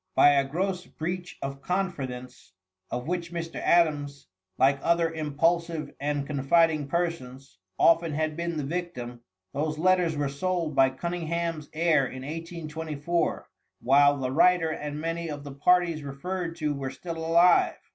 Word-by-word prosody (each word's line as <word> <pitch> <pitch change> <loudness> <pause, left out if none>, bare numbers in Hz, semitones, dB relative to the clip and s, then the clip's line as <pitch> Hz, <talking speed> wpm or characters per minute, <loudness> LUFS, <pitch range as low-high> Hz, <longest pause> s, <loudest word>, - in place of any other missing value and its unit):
By - - +7
a 140 -1 +3
gross 180 +4 -2
breach 180 +3 -5
of 135 0 -5
confidence, 135 - -4 0.4
of 125 +3 -4
which 175 -1 -3
Mr. 165 -1 -5
Adams, 145 -5 +1 0.3
like 135 +1 +4
other 170 -1 +2
impulsive 160 +1 0
and 145 0 -1
confiding 150 +2 +2
persons, 135 - -3 0.2
often 165 -1 +4
had 155 0 -1
been 170 0 -3
the 150 - -2
victim, 135 -7 -5 0.3
those 155 +2 -2
letters 175 -2 +2
were 145 -1 0
sold 165 +3 -2
by 135 -1 +5
Cunningham's 170 +1 -3
heir 155 -4 +2
in 130 0 -8
1824, 160 +1 -3 0.3
while 145 +2 +5
the 130 -2 -2
writer 165 +2 +4
and 150 -1 -5
many 165 +1 -3
of 145 -1 -6
the 140 -1 -8
parties 170 +2 +2
referred 165 +5 -4
to 155 -3 -1
were 135 -2 -4
still 165 +5 -7
alive. 170 +2 +4
160 Hz, 145 wpm, -27 LUFS, 140-170 Hz, 0.4 s, By